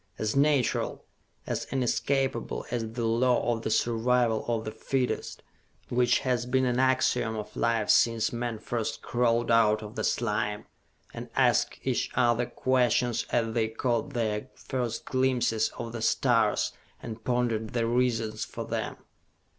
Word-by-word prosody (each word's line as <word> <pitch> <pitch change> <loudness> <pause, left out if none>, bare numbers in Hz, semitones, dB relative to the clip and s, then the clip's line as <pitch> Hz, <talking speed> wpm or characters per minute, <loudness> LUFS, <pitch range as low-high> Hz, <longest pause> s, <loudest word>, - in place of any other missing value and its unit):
As 110 +2 -1
natural, 140 -4 +1 0.4
as - - -3
inescapable 135 -1 -1
as 115 -2 -3
the 120 -1 -2
law 120 +1 +2
of 115 - -4
the - - -3
survival 120 0 +2
of 115 -2 -1
the 110 - -3
fittest, 125 +3 -2 0.5
which 125 0 +3
has 125 -2 0
been 130 +1 +2
an 125 0 +1
axiom 130 -3 +2
of 105 -1 -6
life 115 -2 +1
since 115 -1 +3
men 120 -1 -3
first 115 +1 -4
crawled 120 -1 +1
out 110 -2 +4
of 105 0 -8
the - - -3
slime 105 -2 -1 0.5
and - - -7
asked - - +2
each - - 0
other 120 -1 +2
questions 125 -2 +1
as 115 -2 0
they 115 -2 +1
caught 120 +4 -1
their 110 +1 -1
first 125 -3 -4
glimpses 130 -4 +1
of 115 -1 -5
the 115 -1 -6
stars 115 -2 +2 0.3
and 110 0 -7
pondered 120 -3 -1
the 120 -1 +1
reasons 115 -2 0
for - - -6
them!" - - -3
120 Hz, 145 wpm, -28 LUFS, 110-125 Hz, 0.5 s, out